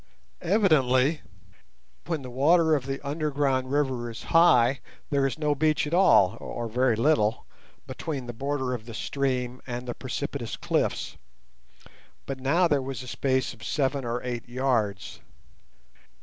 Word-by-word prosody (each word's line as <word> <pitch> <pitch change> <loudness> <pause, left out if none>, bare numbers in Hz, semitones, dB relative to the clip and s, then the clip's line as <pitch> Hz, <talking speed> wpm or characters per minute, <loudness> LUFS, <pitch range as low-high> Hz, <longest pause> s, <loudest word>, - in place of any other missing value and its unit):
Evidently 155 - +3 0.9
when 160 -5 -2
the 125 - -8
water 160 +5 +4
of 135 -3 0
the 135 0 -3
underground 140 -3 0
river 130 -4 0
is 115 - -8
high 135 -6 +5 0.3
there 140 -1 +2
is 135 - -4
no 150 -1 +1
beach 155 +2 +1
at 150 - -5
all, 115 - +5
or 120 -1 -5
very 125 +1 +1
little, 115 -3 +1 0.4
between 140 -6 -5
the 120 - -6
border 130 +1 -2
of 115 -2 -6
the 115 - -8
stream 130 -1 -2
and 125 0 -5
the 120 - -3
precipitous 130 -1 -5
cliffs; - - -1 1.1
but 135 -1 -5
now 165 +7 +3
there 145 -4 +1
was 130 -1 -5
a - - -10
space 130 0 0
of 110 - -15
seven 140 -1 -1
or 120 0 -3
eight 120 -1 -5
yards. 120 -7 -1
130 Hz, 150 wpm, -26 LUFS, 125-145 Hz, 1.1 s, high